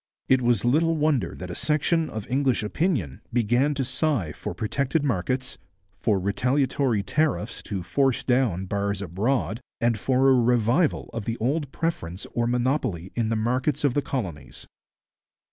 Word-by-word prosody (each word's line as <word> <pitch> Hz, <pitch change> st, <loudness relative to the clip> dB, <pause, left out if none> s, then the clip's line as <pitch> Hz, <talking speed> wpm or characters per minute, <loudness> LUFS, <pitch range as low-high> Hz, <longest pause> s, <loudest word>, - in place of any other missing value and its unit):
It 130 Hz, -1 st, +4 dB
was 120 Hz, -3 st, +2 dB
little 165 Hz, +6 st, +3 dB
wonder 145 Hz, -, +1 dB
that 90 Hz, 0 st, -7 dB
a -, -, -5 dB
section 155 Hz, +1 st, +1 dB
of 110 Hz, -2 st, -6 dB
English 130 Hz, -3 st, +1 dB
opinion 105 Hz, -, -1 dB
began 120 Hz, +5 st, +2 dB
to 135 Hz, -1 st, -1 dB
sigh 130 Hz, -, 0 dB
for -, -, -6 dB
protected 140 Hz, +7 st, -1 dB
markets, 130 Hz, +2 st, -1 dB, 0.4 s
for 100 Hz, +1 st, +1 dB
retaliatory 125 Hz, +3 st, +1 dB
tariffs 120 Hz, -, -1 dB
to 95 Hz, -4 st, -4 dB
force 135 Hz, +6 st, +1 dB
down 125 Hz, -8 st, +1 dB
bars 100 Hz, 0 st, -2 dB
abroad, 110 Hz, +4 st, -1 dB, 0.2 s
and 115 Hz, -2 st, +1 dB
for 130 Hz, +4 st, +2 dB
a -, -, +6 dB
revival 120 Hz, +5 st, +2 dB
of 115 Hz, -3 st, -4 dB
the 115 Hz, 0 st, -2 dB
old 140 Hz, +4 st, -1 dB
preference 95 Hz, -, -3 dB
or 120 Hz, 0 st, 0 dB
monopoly 120 Hz, -, -1 dB
in 115 Hz, -2 st, 0 dB
the 115 Hz, -, +1 dB
markets 125 Hz, +6 st, 0 dB
of 140 Hz, -4 st, +3 dB
the 145 Hz, -, +1 dB
colonies. 95 Hz, -, -5 dB
125 Hz, 155 wpm, -25 LUFS, 105-140 Hz, 0.4 s, a